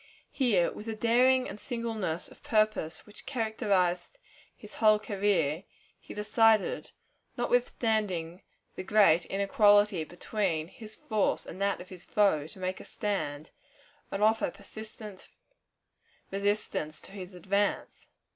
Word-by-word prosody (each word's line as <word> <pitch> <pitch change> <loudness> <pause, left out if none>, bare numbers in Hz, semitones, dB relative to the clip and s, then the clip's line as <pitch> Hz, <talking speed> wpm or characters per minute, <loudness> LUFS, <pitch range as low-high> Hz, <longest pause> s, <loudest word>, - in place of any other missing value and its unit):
Here, 215 -11 +2
with 210 - -9
the 225 - -3
daring 250 +3 +3
and 210 - -8
singleness 225 -9 -3
of - - -17
purpose 215 -7 0
which 210 - -13
characterized 220 - 0 0.4
his - - -11
whole 215 -1 +6
career, 195 -6 0 0.3
he - - -11
decided, 215 0 +2 0.5
notwithstanding 215 -8 0 0.3
the - - -6
great 185 -4 +4
inequality 205 -2 +4
between 175 -1 -2
his 215 +1 -11
force 215 -2 0
and 190 - -9
that 200 0 +1
of 180 - -12
his 180 -2 -10
foe, 195 -8 +2
to 165 - -13
make 185 0 -3
a - - -9
stand, 160 -8 -3 0.6
and 200 +1 -2
offer 220 -2 +3
persistent 210 +1 -10 1.0
resistance 195 -6 -1
to - - -10
his 190 -2 -8
advance. 200 +3 -1
205 Hz, 125 wpm, -29 LUFS, 180-220 Hz, 1.0 s, whole